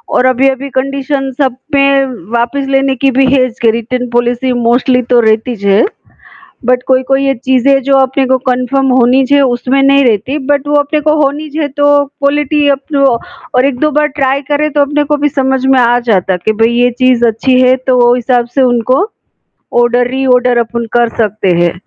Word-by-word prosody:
और 255 - +2
अभी-अभी 265 +2 0
कंडीशन्स 270 0 -3
सब 260 -3 0 0.2
में 275 -1 +2 0.2
वापस 240 +4 -1
लेने 270 0 +1
की 270 +2 0
भी 270 +1 +2
है 255 -2 +3
इसके 230 -2 -1
रिटर्न 245 +2 -4
पॉलिसी 240 +1 0 0.2
मोस्टली 250 +1 +2
तो 240 - +5
रहती 220 +3 0
ज 200 - -9
है। 200 - +3 0.8
बट 250 +1 +1
कोई-कोई 265 +1 +1
ये 270 - +1
चीज़ें 265 +2 +1
जो 275 +1 +1
अपने 265 0 +1
को 260 - +2
कन्फर्म 255 +2 0
होनी 250 +3 +3
चाहिए 285 +2 +2
उसमें 255 +1 0
नहीं 275 0 +4
रहती 235 +5 0
बट 290 0 0
वो 295 - 0
अपने 300 +1 -2
को 305 - +3
होनी 295 +2 -2
चाहिए 300 0 -3
तो 290 0 +3 0.2
क्वालिटी 290 +1 -1
अब 275 - +1
तो 275 -1 +2 0.5
और 255 +2 +3
1-2 280 +3 -1
बार 300 - +1
ट्राई 270 +1 0
करें 300 +1 0
तो 290 - +2
अपने 290 +1 0
को 295 - +2
भी 295 - +2
समझ 265 -2 -1
में 265 -1 +3
आ 240 0 +2
जाता 190 -3 +1
है 180 - -3
कि 220 - +1
भई 230 - +2
ये 245 0 +3
चीज़ 250 -2 +3
अच्छी 255 +3 +1
है 255 0 +4
तो 245 -2 +3
हिसाब 245 -1 0
से 275 - +2
उनको 250 +4 +1 0.8
ऑर्डर, 240 0 +1
री-ऑर्डर 250 -1 +1
अपन 235 0 -2
कर 235 -1 +2
सकते 205 -2 -1
हैं। 170 - 0
260 Hz, 195 wpm, -11 LUFS, 245-275 Hz, 0.8 s, तो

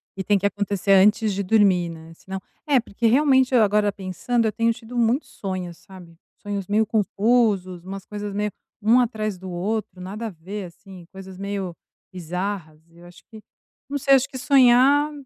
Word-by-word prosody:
e 190 - -4
tem 205 +1 +2
que 195 - -3
acontecer 200 -1 -1
antes 210 +2 +4
de 200 - -2
dormir, 190 -4 +3
né, 165 0 -11
senão 190 +3 -7 0.3
é, 280 -3 +4
porque 230 0 -2
realmente 265 +1 +4
eu 240 -3 +6
agora 210 0 +2
pensando, 200 +5 -2
eu 220 - +1
tenho 230 +1 +1
tido 230 +1 -9
muitos 240 +4 +1
sonhos, 185 -3 -5
sabe, 180 -2 -14 0.2
sonhos 200 -2 -5
meio 215 +2 +2
confusos, 210 -4 +1
umas 195 +1 -8
coisas 205 0 -6
meio 210 +1 -2 0.3
um 225 +4 +4
atrás 215 -5 -2
do 185 0 -8
outro, 195 +2 -3
nada 205 +5 -6
a - - -4
ver, 190 +3 -7
assim, 180 +1 -13
coisas 190 -1 -10
meio 195 -3 -4 0.4
bizarras. 180 -2 -5
Eu 170 +1 -17
acho 175 0 -16
que, 220 -1 -13 0.5
não 285 - -2
sei, 280 0 +3
acho 270 0 +1
que 265 - -8
sonhar 270 +3 +4
205 Hz, 180 wpm, -23 LUFS, 185-230 Hz, 0.5 s, eu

